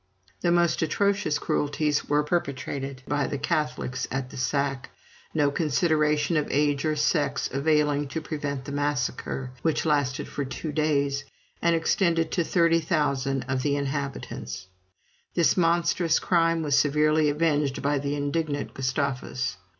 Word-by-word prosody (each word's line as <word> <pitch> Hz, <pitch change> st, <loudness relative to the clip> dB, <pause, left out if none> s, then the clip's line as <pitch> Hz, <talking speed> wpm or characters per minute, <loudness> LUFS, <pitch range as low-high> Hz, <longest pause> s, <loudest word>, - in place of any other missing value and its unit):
The 175 Hz, -, +2 dB
most 175 Hz, -1 st, +2 dB
atrocious 200 Hz, -1 st, +1 dB
cruelties 145 Hz, 0 st, 0 dB
were 150 Hz, 0 st, +3 dB
perpetrated 140 Hz, -4 st, -3 dB
by 145 Hz, 0 st, 0 dB
the 145 Hz, -, -3 dB
Catholics 130 Hz, -3 st, -2 dB
at 135 Hz, -1 st, -3 dB
the -, -, -10 dB
sack; 135 Hz, +1 st, -1 dB, 0.4 s
no 145 Hz, -2 st, +2 dB
consideration 150 Hz, 0 st, +1 dB
of 150 Hz, -, 0 dB
age 145 Hz, +1 st, +1 dB
or 155 Hz, -1 st, +1 dB
sex 145 Hz, -2 st, +1 dB
availing 145 Hz, 0 st, +2 dB
to 150 Hz, +4 st, -3 dB
prevent 145 Hz, -3 st, -4 dB
the 140 Hz, -, -6 dB
massacre, 135 Hz, -2 st, -2 dB
which 160 Hz, 0 st, 0 dB
lasted 145 Hz, -4 st, +1 dB
for 140 Hz, -, -3 dB
two 145 Hz, +3 st, -5 dB
days, 140 Hz, -2 st, 0 dB, 0.4 s
and 170 Hz, 0 st, +3 dB
extended 165 Hz, -1 st, +1 dB
to 175 Hz, -, +1 dB
30,000 155 Hz, -6 st, +1 dB
of 130 Hz, 0 st, -2 dB
the 145 Hz, +1 st, +1 dB
inhabitants. 140 Hz, -8 st, -4 dB, 0.7 s
This 170 Hz, -2 st, +4 dB
monstrous 170 Hz, -1 st, +2 dB
crime 165 Hz, -2 st, +2 dB
was 145 Hz, -2 st, +2 dB
severely 150 Hz, +2 st, +3 dB
avenged 145 Hz, -3 st, 0 dB
by 145 Hz, 0 st, +1 dB
the 140 Hz, +1 st, -2 dB
indignant 145 Hz, 0 st, -2 dB
Gustavus. 130 Hz, -2 st, -2 dB
145 Hz, 135 wpm, -26 LUFS, 140-160 Hz, 0.7 s, This